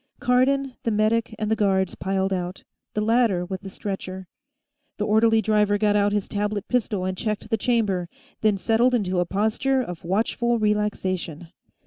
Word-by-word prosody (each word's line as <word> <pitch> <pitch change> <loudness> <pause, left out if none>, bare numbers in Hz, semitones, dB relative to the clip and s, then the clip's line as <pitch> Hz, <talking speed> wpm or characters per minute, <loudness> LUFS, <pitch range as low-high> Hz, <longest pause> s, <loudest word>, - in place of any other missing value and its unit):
Cardon, 260 +2 +2
the - - -1
medic 220 +2 +1
and 215 0 -2
the - - +4
guards 190 -3 +1
piled 190 +1 -1
out, 180 0 -4 0.3
the 210 - +1
latter 220 -5 +2
with 190 +1 -5
the 195 - -8
stretcher. 190 -1 -6 0.7
The 210 - -1
orderly 220 +1 +3
driver 210 -1 +2
got 210 0 +2
out 205 0 +3
his 205 -1 -1
tablet 205 -1 -2
pistol 220 -6 0
and 185 0 -2
checked 215 +1 -3
the - - +4
chamber, 205 -7 0 0.3
then 215 -2 +3
settled 235 +5 +2
into 185 -5 0
a 175 - 0
posture 220 +8 +1
of 180 -9 -5
watchful 230 +6 0
relaxation. 190 -6 -1
210 Hz, 165 wpm, -24 LUFS, 190-225 Hz, 0.7 s, the